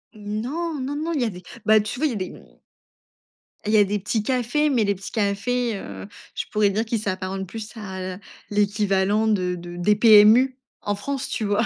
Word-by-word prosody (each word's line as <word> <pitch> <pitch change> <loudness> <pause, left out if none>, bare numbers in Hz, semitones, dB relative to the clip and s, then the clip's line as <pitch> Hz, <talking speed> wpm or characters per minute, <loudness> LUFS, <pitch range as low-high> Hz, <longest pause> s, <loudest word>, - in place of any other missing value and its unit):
Mmh 210 0 -4
non, 315 +5 -3
non, 270 +2 -3
non, 315 +3 -2
il 285 - 0
y - - +2
a - - 0
des, 180 -3 -9 0.2
bah 215 0 +6
tu 215 +4 -4
vois, 310 - +1
il - - +3
y - - -3
a - - -4
des, 185 -3 -3
mmh - - -16 1.1
il 210 - 0
y - - +6
a 205 - +7
des 205 +1 -1
petits 210 +2 -1
cafés, 260 +5 +1
mais 250 -6 +2
les 200 -1 +1
petits 195 +1 -9
cafés, 220 +2 0
heu, 100 - -8 0.3
je - - -3
pourrais 210 -1 +3
dire 210 +3 0
qu'ils 225 0 -1
s'apparentent 190 -1 -3
plus 220 +2 -7
à, 190 -3 -6
heu, - - -12 0.3
l'équivalent 205 0 +1
de 185 -4 +1
de 175 0 -9
des 210 +4 +3
PMU 225 +4 +6 0.2
en 205 - -1
France, 275 +5 -4
tu 220 - -2
vois? 205 +3 +1
210 Hz, 225 wpm, -23 LUFS, 200-240 Hz, 1.1 s, a